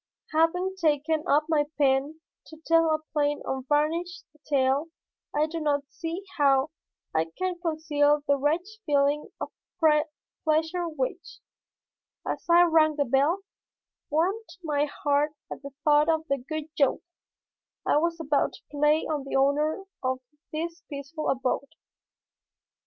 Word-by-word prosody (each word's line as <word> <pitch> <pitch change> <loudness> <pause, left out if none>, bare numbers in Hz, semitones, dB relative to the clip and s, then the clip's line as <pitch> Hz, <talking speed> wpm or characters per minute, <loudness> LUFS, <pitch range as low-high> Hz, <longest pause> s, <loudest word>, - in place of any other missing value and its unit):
Having 360 +4 +2
taken 310 -1 +1
up 295 +2 +4
my 305 -3 +2
pen 280 +2 +1 0.3
to 315 - -12
tell 330 0 +5
a 310 0 0
plain 295 -1 +1
unvarnished 300 +7 -1 0.2
tale 275 +1 +2 0.4
I 295 +1 +2
do 330 +1 -4
not 290 -2 +1
see 335 +4 -5 0.2
how 275 +1 +4 0.4
I 160 0 +2
can 370 -1 -2
conceal 300 -3 +2
the 285 - +3
wretched 340 +10 -1
feeling 290 -1 +1
of - - -5 0.9
pleasure 320 +3 +1
which, 305 +2 -4 0.9
as - - -3
I 345 +1 +7
rang 320 -2 +4
the 285 -1 +1
bell, 280 +9 +2 0.7
warmed 375 +9 0
my 295 -2 +1
heart 290 0 0 0.2
at - - -6
the 280 - -7
thought 300 +1 +4
of 320 -1 +1
the 275 -2 0
good 310 +4 -6
joke 280 -3 +2 0.8
I - - +3
was 335 +2 0
about 295 -3 +1
to - - -14
play 300 +2 +3
on 300 -3 -2
the 275 - -4
owner 295 +6 +2 0.2
of 255 0 -1 0.3
this 335 +2 -4
peaceful 295 +2 -4
abode. 265 +1 -1
300 Hz, 135 wpm, -27 LUFS, 285-325 Hz, 0.9 s, I